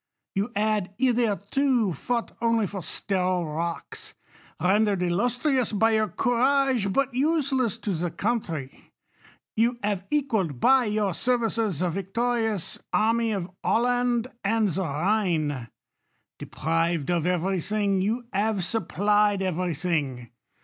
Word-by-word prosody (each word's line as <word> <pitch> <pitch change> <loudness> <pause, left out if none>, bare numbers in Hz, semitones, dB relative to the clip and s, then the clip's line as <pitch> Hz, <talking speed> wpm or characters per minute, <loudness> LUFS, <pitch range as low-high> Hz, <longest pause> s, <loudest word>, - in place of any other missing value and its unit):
You 200 +5 -1
had 205 -2 0
hitherto 240 -1 +1
fought 235 - -2
only 230 -2 +2
for; 195 -1 -5
sterile 180 +1 -1
rocks, 165 +2 -5 0.4
rendered 195 +2 +2
illustrious 245 - +1
by 225 +2 +3
your 220 -1 +2
courage, 250 -2 +2
but 275 +3 +1
u.^eless 270 - +1
to 205 - -1
the 175 +1 -1
country; 165 - -3 0.6
you 235 +2 +2
have 200 -2 -1
equalled 220 - 0
by 265 - +5
your 210 -3 0
ser 250 +8 +1
i 240 - -3
vices 220 -7 -1
the 180 - +1
victorious 220 +2 -1
army 225 +1 +2
of 190 -3 -3
Holland 245 0 +2 0.2
and 215 +1 +2
the 185 +3 -2
Khine« 155 - 0 0.7
Deprived 165 0 -1
of 170 -1 +1
every 180 +1 0
thin,2;, 200 0 0
you 225 +6 -1
have 205 -2 +1
supplied 205 +1 +1
every 180 -2 -1
thins. 140 -8 -2
205 Hz, 125 wpm, -26 LUFS, 180-235 Hz, 0.7 s, by